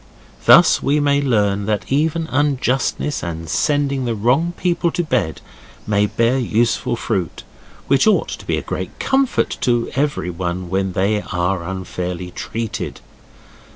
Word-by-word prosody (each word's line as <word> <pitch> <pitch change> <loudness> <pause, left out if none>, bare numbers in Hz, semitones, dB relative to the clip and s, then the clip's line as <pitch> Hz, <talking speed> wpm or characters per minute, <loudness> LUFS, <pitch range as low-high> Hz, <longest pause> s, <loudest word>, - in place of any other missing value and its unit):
Thus - - +7
we 145 +2 +2
may 145 -1 +2
learn 105 -6 +1
that 105 +1 -2
even 160 +3 +1
unjustness 140 0 0
and 80 -1 -5
sending 140 - 0
the 115 -2 -1
wrong 130 +11 +1
people 175 -1 +1
to 175 - -1
bed 120 - -1 0.4
may 105 -1 +2
bear 115 +5 +1
useful 120 0 +1
fruit, 95 - -3 0.4
which 135 +7 +3
ought 215 - +3
to - - -7
be - - +1
a - - -4
great - - -5
comfort 270 -1 +1
to 120 -2 +1
everyone 90 - -2
when 95 -1 0
they 105 +3 +1
are 90 0 0
unfairly 90 0 -5
treated. 115 +3 -5
115 Hz, 140 wpm, -19 LUFS, 95-145 Hz, 0.4 s, Thus